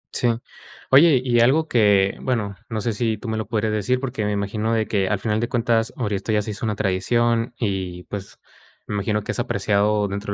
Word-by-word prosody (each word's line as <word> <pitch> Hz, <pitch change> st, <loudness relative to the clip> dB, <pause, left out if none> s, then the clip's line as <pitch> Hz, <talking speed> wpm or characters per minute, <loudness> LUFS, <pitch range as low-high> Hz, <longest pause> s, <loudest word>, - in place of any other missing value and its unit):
Sí. 120 Hz, -, +2 dB, 0.6 s
Oye, 140 Hz, 0 st, +7 dB
y 120 Hz, -2 st, +3 dB
algo 140 Hz, +7 st, +4 dB
que, 100 Hz, -6 st, +3 dB
bueno, 105 Hz, -6 st, -1 dB
no 110 Hz, -2 st, -3 dB
sé 115 Hz, +1 st, -1 dB
si 110 Hz, +1 st, -1 dB
tú 110 Hz, -, -9 dB
me 110 Hz, -, -1 dB
lo 110 Hz, -2 st, -4 dB
podrías 110 Hz, -1 st, -1 dB
decir, 115 Hz, +5 st, 0 dB
porque 125 Hz, -5 st, -3 dB
me 105 Hz, -, 0 dB
imagino 105 Hz, +2 st, -1 dB
de 110 Hz, -1 st, +1 dB
que 100 Hz, -3 st, 0 dB
al 105 Hz, -, +1 dB
final 105 Hz, +1 st, -1 dB
de 120 Hz, +1 st, -2 dB
cuentas, 115 Hz, -2 st, +1 dB
ahora 105 Hz, -5 st, -1 dB
esto 100 Hz, +3 st, -3 dB
ya 105 Hz, -1 st, +2 dB
se 110 Hz, -, -4 dB
hizo 105 Hz, +2 st, -5 dB
una 105 Hz, -, -1 dB
tradición 115 Hz, +4 st, 0 dB
y, 95 Hz, -5 st, -3 dB
pues, 100 Hz, 0 st, -8 dB, 0.5 s
me 105 Hz, -, -4 dB
imagino 105 Hz, +1 st, -1 dB
que -, -, -3 dB
es -, -, -5 dB
apreciado 105 Hz, -2 st, +1 dB
dentro 100 Hz, +1 st, -4 dB
110 Hz, 220 wpm, -22 LUFS, 100-120 Hz, 0.6 s, Oye